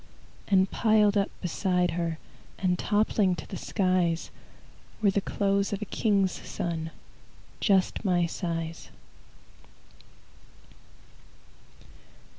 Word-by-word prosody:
And 190 -1 +3
piled 215 -2 +3
up 200 -1 +2
beside 180 0 +1
her 165 -1 -2 0.4
And 180 -2 0
toppling 205 -3 +2
to 155 - -8
the - - -7
skies, 185 -4 0 0.7
Were 205 -3 +3
the 200 - 0
clothes 200 +1 0
of 200 - -3
a - - -4
king's 200 -3 +1
son, 165 -2 -4 0.7
Just 195 -1 +2
my 180 -4 +2
size. 165 -1 -4
190 Hz, 95 wpm, -28 LUFS, 175-200 Hz, 0.7 s, And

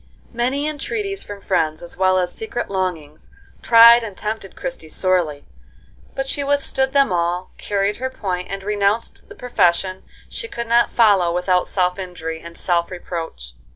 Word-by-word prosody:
Many 255 +5 0
entreaties 395 +7 -3
from 205 -1 -9
friends, 155 -5 0
as 175 - -8
well 185 0 +3
as 180 -1 0
secret 440 - -5
longings, 170 -6 -4 0.3
tried 235 0 +8
and 210 -4 -7
tempted 215 -2 -5
Christie 260 -12 -6
sorely, 170 -6 0 0.7
but 270 - -2
she 280 +1 -1
withstood 275 -1 0
them 275 -6 +4
all, 175 +1 -1
carried 200 0 -1
her 260 +1 -3
point, 185 -7 -4
and 195 0 -5
renounced 205 +2 -1
the - - -11
profession 185 -5 +1 0.3
she 460 - -6
could 235 - -5
not 235 +1 +3
follow 200 -7 +4
without 180 +1 +1
self 180 0 0
injury 165 -3 -6
and 170 0 -11
self 170 -1 0
reproach. 165 - -7
195 Hz, 155 wpm, -20 LUFS, 175-235 Hz, 0.7 s, tried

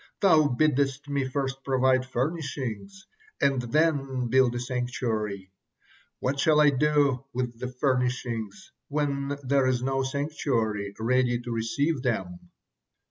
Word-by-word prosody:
Thou 160 -7 +5
biddest 140 +1 +1
me 140 -2 0
first 135 0 -3
provide 130 -1 +2
furnishings 145 - -4 0.3
and 135 -2 +2
then 135 -2 0
build 130 -1 +3
a - - -1
sanctuary. 115 -6 -3 0.7
What 135 +2 -1
shall 155 +1 +4
I 150 -1 +6
do 140 -2 +2
with 120 -2 -3
the 125 0 -4
furnishings 125 - -2 0.2
when 140 -1 -1
there 135 0 +2
is 125 -1 0
no 135 0 0
sanctuary 130 -7 -2
ready 120 +1 +2
to 120 - -6
receive 130 +6 0
them?" 95 -9 -3
130 Hz, 125 wpm, -27 LUFS, 120-140 Hz, 0.7 s, I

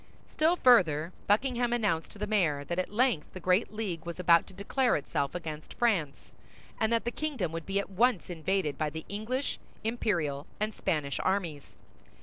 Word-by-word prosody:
Still 320 +3 +2
further, 175 - +4
Buckingham 240 +3 +2
announced 205 -9 0
to - - -12
the 210 - -2
mayor 170 -10 +1
that 170 +5 -3
at 185 - -1
length 230 - +1
the 185 - -6
great 185 +4 +2
league 200 -7 -4
was 170 +1 -6
about 170 -1 +5
to - - -12
declare 245 +6 +1
itself 140 0 -2
against 155 -3 -6
France, 180 -12 0 0.5
and 220 +1 +1
that 230 -1 +1
the 235 - 0
kingdom 260 - -2
would 165 0 -6
be 195 0 -1
at 200 0 -2
once 230 0 +2
invaded 170 -2 -1
by 155 -1 +1
the 160 +1 -7
English, 230 +7 -2 0.2
Imperial, 170 -11 -1
and 215 +1 -1
Spanish 145 -7 -1
armies. 175 -7 -2
190 Hz, 175 wpm, -30 LUFS, 160-230 Hz, 0.5 s, about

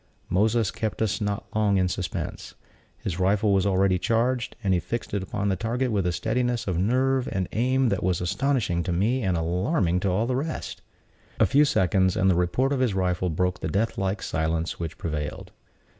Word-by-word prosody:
Moses 110 +3 +2
kept 110 -1 -3
us 110 - -1
not 105 0 -2
long 105 -2 +3
in 90 -1 +2
suspense. 90 0 -4 0.4
His 90 -1 -4
rifle 100 +2 +2
was 95 0 +2
already 95 -1 +2
charged, 120 +3 0
and 95 -2 +2
he 90 - +3
fixed 120 +4 -5
it 100 - 0
upon 100 +2 -3
the 95 - +1
target 120 +6 -1
with 100 -4 +1
a - - +1
steadiness 120 +5 -1
of 90 -3 -1
nerve 130 +5 +1
and 95 -2 -1
aim 130 +2 +2
that 100 -3 -1
was 90 -1 +1
astonishing 95 -1 0
to 90 - -3
me 110 +9 +1
and 95 -5 0
alarming 90 - +1
to 95 - 0
all 100 +5 +1
the 125 +1 -1
rest. 155 +5 -4 0.6
A - - +6
few 145 +2 +4
seconds, 95 - +2
and 95 0 +4
the - - +2
report 105 +11 +1
of 135 - -1
his 125 -6 +1
rifle 90 -1 0
broke 90 +3 -1
the - - -3
deathlike 100 -2 -1
silence 80 +1 -1
which 80 -2 -5
prevailed. 75 -2 -4
100 Hz, 195 wpm, -25 LUFS, 90-115 Hz, 0.6 s, A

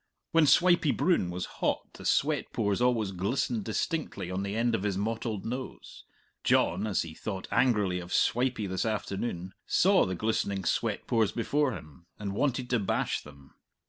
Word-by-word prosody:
When 165 -3 +5
Swipey 175 +2 +5
Broon 165 - +2
was 90 +1 -3 0.2
hot - - -1
the - - -11
sweat - - +1
pores 100 +2 0
always 115 -5 +2
glistened 110 +4 -1
distinctly 110 - -2
on 95 +1 -2
the 100 +1 -3
end 115 +1 +1
of 115 - 0
his 100 -2 -1
mottled 110 0 -2
nose 125 +3 -6 0.4
John, 100 +5 +2
as 100 -4 +1
he 85 -1 -8
thought 95 +2 -5
angrily 105 -6 +2
of 90 0 -9
Swipey 125 -3 +1
this 95 -1 -2
afternoon, 100 -4 -3
saw 195 - +4
the 95 - -2
glistening 100 -1 -1
sweat - - 0
pores 110 -3 +2
before 140 +3 0
him 75 0 -11
and 100 -2 -4
wanted 130 +2 0
to 125 - +3
bash 100 - -1
them. 70 -2 -15
105 Hz, 170 wpm, -29 LUFS, 95-125 Hz, 0.4 s, When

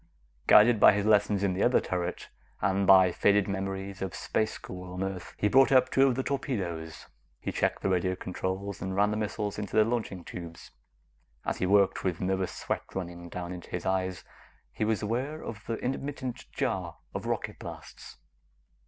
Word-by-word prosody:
Guided 110 +1 +7
by - - +8
his 100 0 0
lessons 105 -2 +3
in 95 -2 +2
the 95 - -2
other 125 - +4
turret, 90 -1 -3 0.3
and 95 0 +1
by 95 -1 +7
faded 100 +2 +3
memories 95 0 -4
of 95 -2 -3
space 110 0 -1
school 90 0 -8
on 90 +1 -3
Earth, 95 -2 -5
he 105 - +2
brought 135 +6 +5
up 130 -1 +5
two 135 +1 +5
of 130 - +1
the 130 - -1
torpedoes. 90 - -3 0.3
He - - -3
checked - - -1
the - - +1
radio 95 0 +1
controls 95 +1 -4
and 95 0 -3
ran 105 +1 +3
the 105 - -1
missiles 105 -1 -3
into 100 -2 -5
their 110 -1 +6
launching 110 -6 -2
tubes. 85 -2 -9 0.7
As - - -1
he 90 - +1
worked, 100 0 +3
with 90 -3 -1
nervous 95 0 -1
sweat - - -2
running 85 -2 -5
down 90 +1 -5
into 90 - -9
his 90 - -4
eyes, 95 -1 -1 0.5
he 110 - -2
was 110 -1 0
aware 130 +9 -2
of 110 -1 -7
the 115 - -1
intermittent 130 0 -4
jar - - -2 0.2
of - - -4
rocket - - -3
blasts. - - -10
95 Hz, 185 wpm, -29 LUFS, 90-110 Hz, 0.7 s, by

